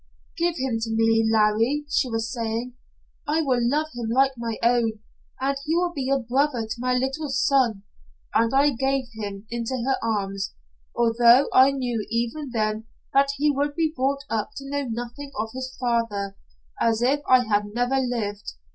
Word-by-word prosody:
"'Give 340 Hz, 0 st, 0 dB
him 255 Hz, -3 st, -1 dB
to 225 Hz, 0 st, -3 dB
me, 225 Hz, 0 st, +3 dB
Larry,' 225 Hz, +7 st, +2 dB
she 295 Hz, -3 st, +1 dB
was 225 Hz, -1 st, -2 dB
saying. 230 Hz, +1 st, -3 dB, 0.5 s
'I 315 Hz, +2 st, +1 dB
will 260 Hz, -4 st, +1 dB
love 300 Hz, +4 st, +1 dB
him 235 Hz, -2 st, -4 dB
like 265 Hz, +3 st, +3 dB
my 235 Hz, -2 st, -4 dB
own, 235 Hz, -1 st, +3 dB, 0.5 s
and 275 Hz, +1 st, 0 dB
he 315 Hz, +3 st, 0 dB
will 350 Hz, 0 st, +1 dB
be 270 Hz, -4 st, -3 dB
a 275 Hz, -, +3 dB
brother 260 Hz, 0 st, 0 dB
to 220 Hz, +1 st, -4 dB
my 250 Hz, +1 st, +1 dB
little 270 Hz, +4 st, -1 dB
son.' 265 Hz, -6 st, +2 dB, 0.5 s
And 230 Hz, 0 st, +3 dB
I 280 Hz, +2 st, +4 dB
gave 270 Hz, +1 st, 0 dB
him 205 Hz, -2 st, -6 dB
into 235 Hz, +2 st, -2 dB
her 270 Hz, 0 st, +1 dB
arms, 195 Hz, -3 st, -2 dB, 0.4 s
although 235 Hz, +2 st, +5 dB
I 260 Hz, +1 st, +7 dB
knew 250 Hz, -5 st, -2 dB
even 235 Hz, +6 st, -2 dB
then 215 Hz, -1 st, -1 dB, 0.3 s
that 275 Hz, +1 st, +4 dB
he 295 Hz, +2 st, +3 dB
would 285 Hz, +1 st, -1 dB
be 320 Hz, -2 st, 0 dB
brought 275 Hz, +2 st, 0 dB
up 215 Hz, -2 st, -2 dB
to 275 Hz, -, -7 dB
know 285 Hz, -1 st, -2 dB
nothing 240 Hz, +5 st, -6 dB
of 220 Hz, +1 st, -2 dB
his 260 Hz, 0 st, -6 dB
father, 230 Hz, -5 st, -1 dB, 0.5 s
as 230 Hz, 0 st, +2 dB
if 275 Hz, +4 st, +3 dB
I 255 Hz, -1 st, +6 dB
had 210 Hz, -1 st, +1 dB
never 245 Hz, +2 st, +1 dB
lived. 225 Hz, -5 st, -3 dB
245 Hz, 175 wpm, -24 LUFS, 225-275 Hz, 0.5 s, I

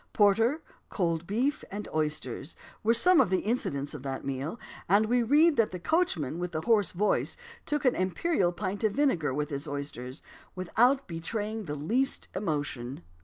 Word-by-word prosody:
"Porter, 225 Hz, +9 st, +3 dB, 0.3 s
cold 170 Hz, -3 st, -1 dB
beef, 260 Hz, +9 st, 0 dB
and 205 Hz, +1 st, -5 dB
oysters," 150 Hz, -3 st, -2 dB, 0.3 s
were 220 Hz, -, +3 dB
some 360 Hz, +9 st, +6 dB
of -, -, +2 dB
the 185 Hz, 0 st, +1 dB
incidents 145 Hz, -, -2 dB
of 150 Hz, -, -7 dB
that 135 Hz, -1 st, -5 dB
meal, 140 Hz, -, -3 dB, 0.3 s
and 205 Hz, +3 st, +5 dB
we 245 Hz, +2 st, +2 dB
read 295 Hz, +6 st, +4 dB
that 230 Hz, -, +3 dB
"the 180 Hz, -, -5 dB
coachman 175 Hz, -, 0 dB
with 180 Hz, 0 st, -4 dB
the 155 Hz, -, -1 dB
hoarse 210 Hz, +1 st, +3 dB
voice 205 Hz, +4 st, 0 dB, 0.3 s
took 295 Hz, -1 st, -1 dB
an 250 Hz, -, +5 dB
imperial 185 Hz, -, +1 dB
pint 195 Hz, +3 st, -4 dB
of 215 Hz, -2 st, +2 dB
vinegar 255 Hz, -, +1 dB
with 150 Hz, +3 st, -2 dB
his 140 Hz, +2 st, -4 dB
oysters, 140 Hz, -2 st, -6 dB, 0.3 s
without 245 Hz, +9 st, +2 dB
betraying 210 Hz, +6 st, -4 dB
the 150 Hz, -2 st, -4 dB
least 235 Hz, -, 0 dB
emotion." 145 Hz, -, -3 dB
190 Hz, 170 wpm, -29 LUFS, 150-230 Hz, 0.3 s, some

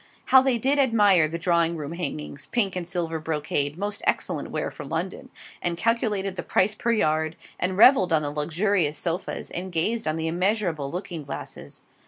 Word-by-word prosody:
How 265 Hz, -, +7 dB
they 260 Hz, -2 st, +2 dB
did 270 Hz, +5 st, +1 dB
admire 205 Hz, -, +4 dB
the 165 Hz, +2 st, -4 dB
drawing 170 Hz, -1 st, +1 dB
room 150 Hz, -1 st, -5 dB
hangings, 110 Hz, -, -5 dB
(pink 220 Hz, -6 st, +1 dB
and 180 Hz, -2 st, -3 dB
silver 165 Hz, -3 st, -2 dB
brocade, 150 Hz, -1 st, -2 dB
most 205 Hz, +2 st, -3 dB
excellent -, -, -1 dB
wear -, -, -3 dB
for -, -, -9 dB
London,) -, -, -4 dB, 0.3 s
and 175 Hz, -1 st, -1 dB
calculated 210 Hz, -3 st, 0 dB
the -, -, -1 dB
price 200 Hz, +3 st, +2 dB
per 235 Hz, +2 st, -1 dB
yard; 160 Hz, -6 st, +1 dB, 0.2 s
and 185 Hz, +1 st, 0 dB
revelled 210 Hz, -6 st, +6 dB
on 155 Hz, -2 st, +3 dB
the 145 Hz, -, -2 dB
luxurious 160 Hz, +1 st, 0 dB
sofas; 170 Hz, 0 st, -3 dB
and 185 Hz, +2 st, -5 dB
gazed 215 Hz, +7 st, 0 dB
on 155 Hz, -, 0 dB
the 160 Hz, 0 st, -2 dB
immeasurable 175 Hz, -4 st, 0 dB
looking 175 Hz, 0 st, -5 dB
glasses. 140 Hz, -, -7 dB
175 Hz, 180 wpm, -25 LUFS, 160-205 Hz, 0.3 s, How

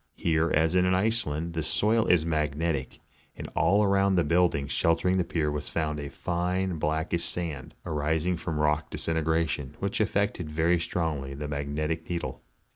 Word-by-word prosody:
Here, 80 Hz, 0 st, +1 dB
as 80 Hz, +2 st, +3 dB
in 90 Hz, 0 st, +3 dB
Iceland, 90 Hz, -6 st, 0 dB
the 80 Hz, -, -1 dB
soil 110 Hz, +7 st, +2 dB
is 85 Hz, -3 st, +4 dB
magnetic, 75 Hz, -2 st, -1 dB, 0.4 s
and -, -, -7 dB
around 100 Hz, -1 st, +3 dB
the 85 Hz, -, +3 dB
build 85 Hz, +3 st, +3 dB
ing 70 Hz, -, -2 dB
sheltering 85 Hz, +6 st, +2 dB
the -, -, +3 dB
pier 80 Hz, -3 st, -1 dB
was 75 Hz, 0 st, -4 dB
found 75 Hz, -2 st, -1 dB
a 70 Hz, -1 st, -5 dB
fine 90 Hz, +1 st, -1 dB
blackish 80 Hz, +3 st, -1 dB
sand, 80 Hz, -7 st, -4 dB
arising 80 Hz, +3 st, 0 dB
from 80 Hz, -1 st, -3 dB
rock 75 Hz, 0 st, +1 dB
disintegration, 80 Hz, -3 st, -1 dB
which 100 Hz, 0 st, -2 dB
affected 100 Hz, -5 st, 0 dB
very 80 Hz, +3 st, +2 dB
strongly 75 Hz, -6 st, -2 dB
the 75 Hz, +1 st, -5 dB
mag 70 Hz, 0 st, -3 dB
netic 80 Hz, +2 st, -2 dB
needle. 85 Hz, -1 st, -3 dB
80 Hz, 160 wpm, -28 LUFS, 75-90 Hz, 0.4 s, is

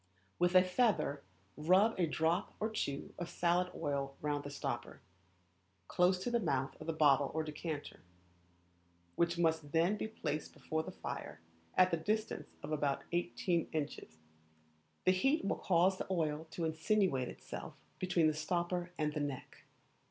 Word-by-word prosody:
With 175 Hz, +1 st, +3 dB
a 185 Hz, -, +9 dB
feather 185 Hz, -, +1 dB, 0.3 s
rub 185 Hz, +8 st, +4 dB
a 175 Hz, -, +3 dB
drop 165 Hz, +5 st, 0 dB
or 220 Hz, +1 st, -1 dB
two 140 Hz, -10 st, -3 dB
of 175 Hz, -1 st, -4 dB
salad 175 Hz, +1 st, +1 dB
oil 140 Hz, -1 st, -2 dB
round 145 Hz, -1 st, -1 dB
the 145 Hz, -, -6 dB
stopper, 145 Hz, -, -4 dB, 0.9 s
close 180 Hz, +1 st, +3 dB
to 245 Hz, -, -1 dB
the 235 Hz, -, +3 dB
mouth 135 Hz, -, 0 dB
of -, -, -7 dB
the -, -, +1 dB
bottle 145 Hz, -3 st, +4 dB
or 160 Hz, -, +1 dB
decanter, 150 Hz, 0 st, -5 dB, 1.2 s
which 170 Hz, 0 st, +2 dB
must 160 Hz, -3 st, +1 dB
then 170 Hz, +6 st, +3 dB
be 220 Hz, -, -2 dB
placed 155 Hz, -8 st, -4 dB
before 160 Hz, 0 st, -2 dB
the -, -, -7 dB
fire, 80 Hz, -, -6 dB, 0.4 s
at 185 Hz, 0 st, +5 dB
the 170 Hz, -, +2 dB
distance 215 Hz, +6 st, -2 dB
of -, -, -5 dB
about 145 Hz, -2 st, 0 dB
eighteen 175 Hz, 0 st, 0 dB
inches; 145 Hz, -, -4 dB, 0.9 s
the 185 Hz, -, +6 dB
heat 270 Hz, -, +2 dB
will -, -, 0 dB
cause 185 Hz, +1 st, +3 dB
the -, -, -3 dB
oil 160 Hz, -3 st, -1 dB
to 170 Hz, -, -3 dB
insinuate 160 Hz, -, +1 dB
itself -, -, -8 dB, 0.2 s
between 180 Hz, -3 st, +2 dB
the 155 Hz, -, +4 dB
stopper 175 Hz, +3 st, -1 dB
and 150 Hz, -1 st, 0 dB
the 150 Hz, -, -2 dB
neck. 145 Hz, -3 st, -5 dB
165 Hz, 160 wpm, -35 LUFS, 150-185 Hz, 1.2 s, a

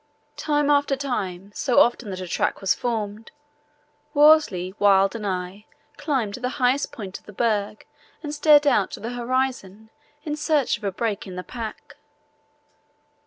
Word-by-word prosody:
Time 295 Hz, -1 st, +1 dB
after 285 Hz, -1 st, +2 dB
time, 200 Hz, -9 st, -4 dB
so 255 Hz, +1 st, +2 dB
often 240 Hz, -2 st, +2 dB
that 185 Hz, -1 st, -5 dB
a 185 Hz, -, -6 dB
track -, -, -1 dB
was 195 Hz, -1 st, +2 dB
formed, 220 Hz, -2 st, -4 dB, 0.9 s
Worsley, 290 Hz, -, +4 dB
Wild, 195 Hz, -1 st, +4 dB
and 215 Hz, -3 st, -4 dB
I, 185 Hz, +2 st, -5 dB, 0.3 s
climbed 255 Hz, -9 st, -1 dB
to -, -, -6 dB
the 250 Hz, 0 st, -2 dB
highest 260 Hz, +1 st, +1 dB
point 195 Hz, -4 st, -7 dB
of -, -, -32 dB
the 210 Hz, -, -11 dB
berg 210 Hz, -1 st, -1 dB, 0.4 s
and 295 Hz, -1 st, -4 dB
stared 295 Hz, 0 st, +5 dB
out 245 Hz, -9 st, +3 dB
to -, -, -6 dB
the 230 Hz, +3 st, -5 dB
horizon 240 Hz, -4 st, -3 dB, 0.3 s
in 300 Hz, -2 st, -3 dB
search 300 Hz, -3 st, +1 dB
of -, -, -22 dB
a 200 Hz, -, -1 dB
break 210 Hz, 0 st, -3 dB
in 185 Hz, -, -8 dB
the 180 Hz, -, -5 dB
pack. 230 Hz, 0 st, -8 dB
230 Hz, 165 wpm, -23 LUFS, 200-275 Hz, 0.9 s, stared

